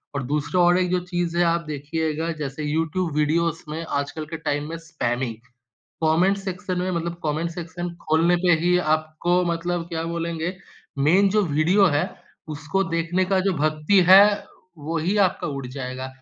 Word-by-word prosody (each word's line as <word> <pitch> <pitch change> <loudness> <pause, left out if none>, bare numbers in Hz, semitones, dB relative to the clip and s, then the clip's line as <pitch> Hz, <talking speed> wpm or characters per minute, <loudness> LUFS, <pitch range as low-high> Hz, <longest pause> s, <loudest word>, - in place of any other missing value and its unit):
और 140 - -2
दूसरा 150 +5 0
और 175 +1 +5
एक 180 -1 0
जो 180 - +2
चीज़ 175 -2 -2
है 175 - +4
आप 170 0 +2
देखिएगा 155 +2 -2
जैसे 145 +1 -4
यूट्यूब 160 +3 -1
वीडियोज़ 165 +2 +1
में 160 +2 -4
आजकल 145 +2 -3
के 165 +2 -6
टाइम 145 -1 -2
में 165 - -5
स्पैमिंग। 130 -8 -3 0.7
कॉमेंट 170 +5 +3
सेक्शन 190 -1 -4
में 180 +1 -1
मतलब 170 0 -2
कॉमेंट 155 +2 -1
सेक्शन 175 +1 -6 0.2
खोलने 165 +3 +3
पे 175 - +5
ही 180 +1 +3 0.2
आपको 155 +3 -1
मतलब 170 0 -1
क्या 165 -1 -3
बोलेंगे? 170 +1 -3 0.4
मेन 175 +8 +4
जो 210 +2 +2
वीडियो 170 +7 +3
है 145 - +2 0.5
उसको 155 +6 -1
देखने 165 +3 0
का 190 0 +1
जो 195 - +2
भक्ति 155 +6 +2
है, 190 +2 +10 0.5
वही 165 +6 -1
आपका 185 - -3
उड़ 140 -2 -5
जाएगा, 130 0 -5
165 Hz, 165 wpm, -23 LUFS, 150-175 Hz, 0.7 s, है